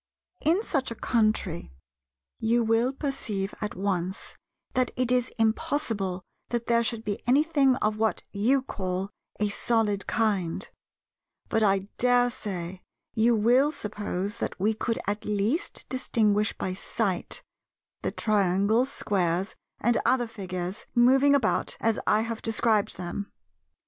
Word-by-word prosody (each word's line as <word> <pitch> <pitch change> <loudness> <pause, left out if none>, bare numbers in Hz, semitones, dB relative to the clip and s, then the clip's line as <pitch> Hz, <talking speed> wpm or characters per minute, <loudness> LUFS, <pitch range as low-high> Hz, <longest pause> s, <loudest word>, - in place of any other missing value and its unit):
In 340 +8 +3
such 275 - 0
a 230 - -5
country, 215 - 0 0.7
you 235 +1 +2
will 225 +3 +2
perceive 235 -8 -3
at 210 -1 -3
once 190 0 -2 0.4
that 255 -1 +2
it 255 -1 +2
is 250 0 +2
impossible 220 -5 0 0.3
that 240 -1 -1
there 235 0 +3
should 225 -1 -2
be 205 -2 -3
anything 280 0 +4
of 215 0 +1
what 220 0 0
you 250 +7 +2
call 190 -4 -3 0.3
a 210 - +2
"solid" 205 -1 0
kind; 200 -2 0 0.8
but 220 - +1
I 195 -2 +2
dare 245 0 +4
say 185 -5 -5 0.3
you 230 +2 +3
will 245 +7 +4
suppose 205 -4 -4
that - - -4
we 210 +4 +2
could 225 +1 -2
at 205 +2 -1
least 210 - -1
distinguish 215 -5 +1
by 185 - -2
sight 195 -1 -2 0.6
the - - -1
Triangles, 210 +4 +2
Squares, 185 -1 0 0.2
and 240 +2 +2
other 245 +1 +2
figures, 190 -3 -5
moving 265 +4 +5
about 250 -6 0
as 225 -1 +1
I 210 - +4
have 230 0 -4
described 220 -2 +1
them. 185 +3 -5
220 Hz, 135 wpm, -27 LUFS, 200-240 Hz, 0.8 s, moving